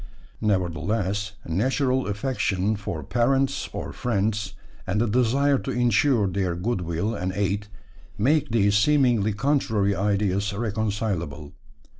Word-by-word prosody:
Nevertheless, 100 +2 -1
natural 130 - 0
affection 105 -2 0
for 85 -7 -5
parents 135 - +1
or - - -5
friends, 105 -3 -1 0.3
and 95 +3 0
the 115 - +3
desire 125 +5 +2
to - - -6
insure 120 -1 +2
their 95 -2 -1
goodwill 90 0 -2
and 95 -4 -2
aid, 100 +1 -1 0.5
make 145 +6 +2
these 105 -3 +2
seemingly 120 -2 +3
contrary 110 -5 +1
ideas 100 0 0
reconcilable. 100 -9 -3
105 Hz, 110 wpm, -25 LUFS, 95-120 Hz, 0.5 s, the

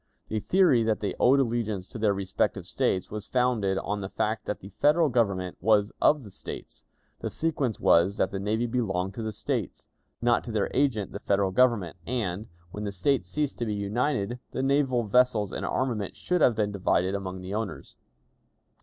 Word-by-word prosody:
The 110 - -1
theory 175 - +4
that 110 -1 +1
they 105 -2 -2
owed 135 +3 +5
allegiance 115 -6 -1
to 120 - -8
their 105 -1 +3
respective 95 -1 -1
States 95 - -1
was 105 -1 -5
founded 120 -7 +1
on 100 +1 -2
the 95 - -5
fact 110 +2 -2
that 105 - -3
the 95 - -11
Federal 150 - +3
Government 100 -7 0
was 105 -1 +3
of 150 -2 +4
the 105 - -11
States; - - -8 0.4
the - - -3
sequence 145 -8 -1
was, 90 +5 +4
that - - +1
the 95 - -3
navy 110 +4 0
belonged 100 -6 -1
to 115 - -6
the 110 -1 -3
States, - - -4 0.3
not 120 0 +2
to 120 - -5
their 105 -2 0
agent 130 -8 +1
the - - -6
Federal 100 -1 +1
Government; 105 -6 +2
and, 110 -4 -2 0.2
when 105 - -6
the 100 - -2
States 100 +1 0
ceased 145 +8 -2
to 120 - -1
be 105 - -1
united, 120 +3 -1
the 130 - -1
naval 135 -3 +2
vessels 110 -2 +2
and - - -3
armament 115 -7 -1
should 180 -2 -1
have 120 - +5
been 105 -1 0
divided 95 -1 +1
among 95 -2 -4
the 95 +2 -6
owners. 100 -10 -5
110 Hz, 190 wpm, -27 LUFS, 100-125 Hz, 0.4 s, owed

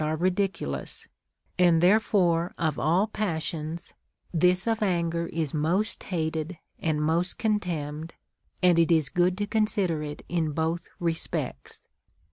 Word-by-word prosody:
are 155 +1 0
ridiculous; 180 - -2 0.5
and 175 -2 +5
therefore 180 -3 +3
of 160 -3 0
all 175 +6 +3
passions, 165 -5 -3 0.4
this 180 +2 +3
of 225 -1 0
anger 170 -4 0
is 160 -4 -2
iTiost 170 +8 0
hated 160 -1 -2 0.2
and 155 -2 0
most 170 +4 +1
contemned, 165 -8 -2 0.5
and 175 -2 +5
it 165 +1 +4
is 155 -4 +3
good 180 +1 +2
to 205 - 0
con 215 +1 +2
sider 185 -8 0
it 150 -1 -6
in 165 -3 -1
both 165 +2 -1
respects. 165 - -3
170 Hz, 130 wpm, -27 LUFS, 160-185 Hz, 0.5 s, and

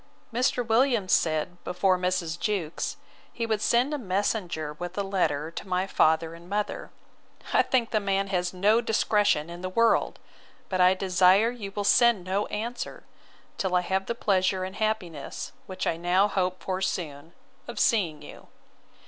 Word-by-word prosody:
Mr. 245 0 +1
Williams 230 -3 +2
said, 160 +2 0
before 185 +1 +1
Mrs. 180 -2 -1
Jewkes, 185 -7 -2 0.3
he 230 - -3
would 220 -2 -1
send 245 +6 +2
a 295 - -2
messenger 185 - -2
with 175 +2 -6
a 200 - 0
letter 165 -6 -1
to 180 - -7
my 185 0 0
father 160 -3 +2
and 170 +1 -13
mother.—I 205 +1 -3
think 245 -3 0
the 215 - +2
man 195 -1 0
has 180 -2 0
no 205 +5 +3
discretion 210 -8 +2
in 170 +1 -9
the 185 - -3
world: 230 +4 +2 0.5
but 185 -1 0
I 180 +1 +6
desire 190 +4 +4
you 215 -5 -7
will 205 - -1
send 235 -2 +4
no 190 +3 -1
answer, 230 +4 -5 0.6
till 190 -2 0
I 180 - +4
have 190 +1 -1
the 235 - -2
pleasure 190 -3 +1
and 190 +1 -6
happiness 200 -9 -3 0.2
which 185 -1 -4
now 175 +4 +2
I - - -1
hope 185 -2 -1
for 190 0 -2
soon, 160 -4 -4 0.3
of - - -6
seeing 175 - +1
you. - - -12
190 Hz, 165 wpm, -27 LUFS, 175-215 Hz, 0.6 s, I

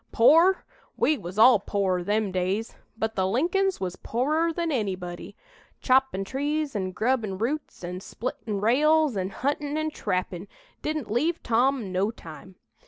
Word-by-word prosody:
"Pore? 330 +10 +5 0.3
We 310 - +3
was 180 -5 -8
all 225 0 +7
pore, 190 -3 -1
them 210 +1 0
days, 190 +5 -2 0.2
but 220 0 -2
the 190 -2 0
Lincolns 360 - +1
was 185 -1 -4
porer 305 +8 0
than 335 0 -2
anybody. 185 -8 -4 0.4
Choppin' 260 -7 +2
trees 290 +3 -2
an' 190 -2 -1
grubbin' 220 -2 -1
roots 255 +1 -3
an' 180 +1 -5
splittin' 215 0 -5
rails 295 +5 +3
an' 190 -1 -2
huntin' 285 +6 -2
an' 310 0 -1
trappin' 185 - -3 0.3
didn't 305 -8 -3
leave 315 +9 0
Tom 240 -2 +1
no 190 +3 +1
time. 185 -3 -11
230 Hz, 145 wpm, -26 LUFS, 190-295 Hz, 0.4 s, all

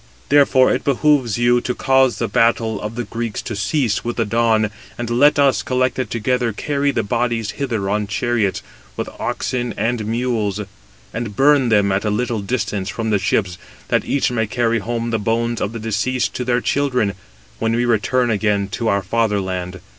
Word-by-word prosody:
Therefore 140 -2 +5
it - - -2
behoves 140 -5 +2
you 120 0 +3
to 125 0 -3
cause 130 -2 +3
the 115 - -1
battle 115 -2 +1
of 105 +2 -5
the 120 - -2
Greeks 115 0 -4
to 110 - -5
cease 105 +3 0
with 120 0 -3
the 115 - 0
dawn, 110 -1 +2 0.3
and 120 -1 -4
let 145 +6 +4
us, 135 -6 +3
collected 130 0 -1
together, 120 +1 0
carry 145 +6 -1
the - - 0
bodies 115 0 -1
hither 115 -8 -3
on 105 +1 -1
chariots, 110 -1 -1 0.3
with - - -3
oxen 120 -3 -2
and 115 0 -1
mules, 115 -3 -1 0.5
and 115 -2 -4
burn 140 -1 +4
them 105 -3 +3
at 95 +1 0
a 105 - 0
little 115 +1 -1
distance 100 -3 -2
from 110 0 -3
the 105 - +2
ships, 95 -2 0 0.3
that - - +2
each 140 -2 0
may 110 -2 0
carry 115 +1 0
home 115 +2 -3
the 115 - 0
bones 115 +2 -1
[of 100 - -1
the 115 - -6
deceased] 115 +4 -1
to 125 - -3
their 125 0 +1
children, 125 -8 0 0.5
when 115 0 0
we 120 +1 +1
return 120 +2 +1
again 105 -2 0
to 115 +3 -3
our 100 -2 +1
father 105 +1 +1
land. 95 -1 -4
115 Hz, 185 wpm, -19 LUFS, 105-125 Hz, 0.5 s, Therefore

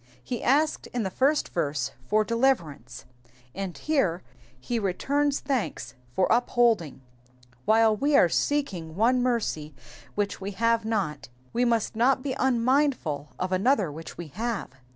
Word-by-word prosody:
He 245 -3 -4
asked 300 +4 +2
in 245 -2 -3
th^ 190 - -3
first 280 +8 +1
verse 140 -6 -1 0.2
for 215 +7 +3
deliverance, 170 - -1 0.5
and 190 -2 -5
here 195 - 0 0.4
he 235 - -2
returns 280 +9 0
thanks 270 -5 -2 0.2
for 185 - +3
upholding: 230 - +2 0.6
while 220 0 +4
we 285 +6 +1
are - - +6
seeking 180 - -1
one 245 +5 +3
mercy 210 - -1 0.4
which 205 -1 -2
we 200 +1 -4
have 230 +2 +1
not, 195 - -2 0.2
we 245 +1 +2
must 230 -2 0
not 255 +3 +2
be 275 -2 -2
unmindful 250 - +1
of 185 0 -3
another 195 - +2
which 160 +3 -9
we 170 -3 -7
have. 225 - -3
225 Hz, 140 wpm, -26 LUFS, 175-255 Hz, 0.6 s, are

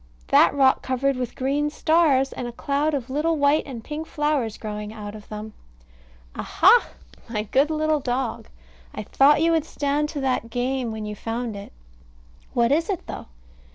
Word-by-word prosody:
that - - +6
rock 270 -2 +4
covered 265 +1 0
with 250 -2 -4
green 285 +3 0
stars 295 -4 +2
and 245 - -5
a - - -5
cloud 285 +5 -1
of 260 -4 -4
little 315 +4 0
white 285 +1 +3
and 240 -5 -7
pink 310 +4 -6
flowers 295 -9 -1
growing 210 -1 -6
out 210 -2 -8
of 215 -1 -12
them. 215 0 -7 0.8
Aha! - - +4 0.4
my 210 -2 -2
good 270 +8 +2
little 310 -1 +1
dog! 250 -2 -3 0.5
I - - -4
thought 295 +3 +4
you 335 - +3
would 325 -2 +2
stand 295 -1 -1
to 290 -3 -4
that 255 -3 -1
game 245 0 -2
when 220 -1 -5
you 210 0 -5
found 225 +1 -4
it. 200 0 -9 0.8
What 235 0 +3
is 325 +5 +1
it, 380 -4 -3
though? - - -7
270 Hz, 175 wpm, -24 LUFS, 230-295 Hz, 0.8 s, that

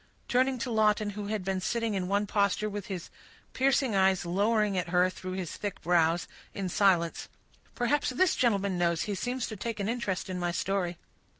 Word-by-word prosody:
Turning 255 +1 +2
to 245 +1 -3
Lawton, 215 -1 +2
who 205 0 -6
had 210 -2 -2
been 190 -1 -1
sitting 230 +2 -1
in 185 -2 -1
one 200 +2 +1
posture, 200 0 +1
with 205 -2 -5
his 185 -4 -6 0.4
piercing 265 -2 +2
eyes 190 -1 +3
lowering 205 +3 +1
at 180 -2 -1
her 180 +1 +3
through 185 0 -7
his 185 -3 -4
thick 205 -2 -4
brows, 170 -1 +2 0.3
in 195 -1 -2
silence, 180 -3 +2 0.5
"Perhaps 265 +4 +1
this 320 +8 +2
gentleman 200 -6 +1
knows—he 170 +3 +1
seems 245 +5 -2
to 220 - -6
take 225 +2 -4
an 200 - -1
interest 230 -5 -2
in 185 -1 -4
my 175 0 0
story." 180 -1 -1
200 Hz, 185 wpm, -29 LUFS, 185-225 Hz, 0.5 s, eyes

